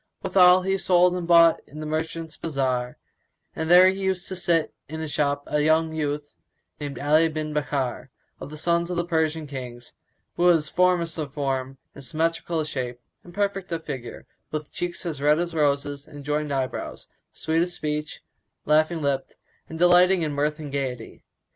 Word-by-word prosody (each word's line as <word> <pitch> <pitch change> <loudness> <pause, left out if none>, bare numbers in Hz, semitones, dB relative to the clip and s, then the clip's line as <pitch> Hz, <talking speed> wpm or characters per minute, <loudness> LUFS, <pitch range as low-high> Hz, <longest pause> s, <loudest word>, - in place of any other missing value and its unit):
Withal 180 -1 +6
he 195 +1 0
sold 180 -1 +4
and 180 -2 -3
bought 170 -1 +6
in 150 - -11
the 155 - -5
merchants' 160 +1 -4
bazar, 130 -5 -2 0.6
and 160 0 -3
there 180 +1 +8
used 190 -1 -1
to 190 - -4
sit 170 -3 +1 0.2
in 160 +1 -5
his 160 -2 -4
shop 145 -1 0
a 150 - 0
youth 155 -2 0 0.5
named 145 -2 -5
Ali 155 +3 +3
bin 155 -1 -4
Bakkár, 140 -4 -2 0.3
of - - -8
the 155 - -9
sons 170 +2 0
of 180 - -3
the 175 - 0
Persian 160 -2 0
Kings[FN#175] 125 -4 -8 0.5
who 175 - +1
was 165 -4 +4
formous 175 -2 +2
of 145 -3 -4
form 135 -2 -2 0.2
and 140 - -11
symmetrical 165 +2 -1
of 155 - -4
shape 125 -4 -4 0.2
and 175 - -13
perfect 195 -1 -2
of 165 -1 -4
figure, 130 -5 -7 0.2
with 155 -1 -5
cheeks 175 +1 -4
red 150 +2 +3
as 170 0 -2
roses 145 -1 0
and 145 -2 -11
joined 150 0 -1
eyebrows; 130 -2 -3 0.2
sweet 160 +1 0
of 175 - 0
speech, 150 -3 -4 0.4
laughing 155 +1 +2
lipped 140 -1 -1 0.3
and 160 - -7
delighting 180 +1 +5
in 155 - -1
mirth 150 +1 0
and 150 -3 -7
gaiety. 130 -5 -4
155 Hz, 175 wpm, -25 LUFS, 145-170 Hz, 0.6 s, there